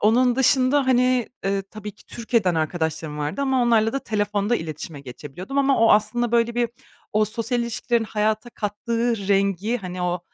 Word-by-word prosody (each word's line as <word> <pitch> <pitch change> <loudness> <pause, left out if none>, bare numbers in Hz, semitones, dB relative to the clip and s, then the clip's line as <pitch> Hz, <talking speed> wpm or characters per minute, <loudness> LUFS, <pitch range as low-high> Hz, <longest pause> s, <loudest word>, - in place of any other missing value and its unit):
Onun 245 +3 +3
dışında, 265 +1 +3
hani, 250 -1 +3 0.2
ııı, 195 0 0
tabii 210 +1 -9
ki - - -22
Türkiye'den 225 -6 0
arkadaşlarım 160 -1 -2
vardı 150 - -3
ama 265 -2 +2
onlarla 225 -2 +3
da 275 - 0
telefonda 210 0 0
iletişime 155 -3 -6
geçebiliyordum 150 - -6
ama 275 -1 +3
o 225 0 +5
aslında, 220 +3 +1
böyle 235 0 +2
bir, 240 -1 +1 0.4
o 215 +1 +3
sosyal 230 +3 -1
ilişkilerin 235 0 -1
hayata 215 +2 -1
kattığı 230 0 -2
rengi, 200 +3 +1
hani, 185 -2 -6
o 180 0 -1
215 Hz, 160 wpm, -23 LUFS, 195-240 Hz, 0.4 s, o